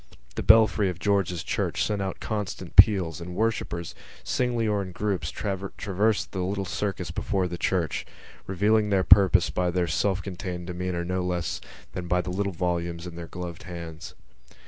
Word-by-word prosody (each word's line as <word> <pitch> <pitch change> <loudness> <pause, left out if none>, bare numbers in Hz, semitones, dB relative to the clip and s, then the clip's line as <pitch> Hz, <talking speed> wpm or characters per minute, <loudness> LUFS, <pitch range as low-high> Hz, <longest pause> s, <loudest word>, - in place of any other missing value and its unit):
The - - -3
belfry 110 -2 +5
of 90 - -5
George's 95 -4 0
Church - - -1
sent 105 -2 -1
out 95 -1 -3
constant 100 -4 -4
peals 95 -6 +6
and 90 +1 -7
worshippers, 105 -6 -1 0.3
singly 120 -2 0
or 105 -1 +1
in 95 -2 -7
groups, 95 -5 -1
traversed 100 +2 -1
the 95 - -4
little 95 +2 -2
circus 95 -2 -3
before 95 +1 -1
the 85 -1 -6
church, 85 -5 0 0.4
revealing 105 +3 +2
their 95 -2 +3
purpose 95 -2 +6
by 90 0 0
their 90 0 +1
self 95 +2 0
contained 90 -2 -5
demeanour 90 -1 -3
no 90 +1 -1
less 90 -2 -2 0.3
than 90 -1 -5
by 90 +1 +2
the 90 - -5
little 100 +2 -1
volumes 85 -1 -2
in 85 -1 -8
their 85 -1 -7
gloved 90 -1 -7
hands. 85 -2 -8
90 Hz, 170 wpm, -26 LUFS, 85-100 Hz, 0.4 s, peals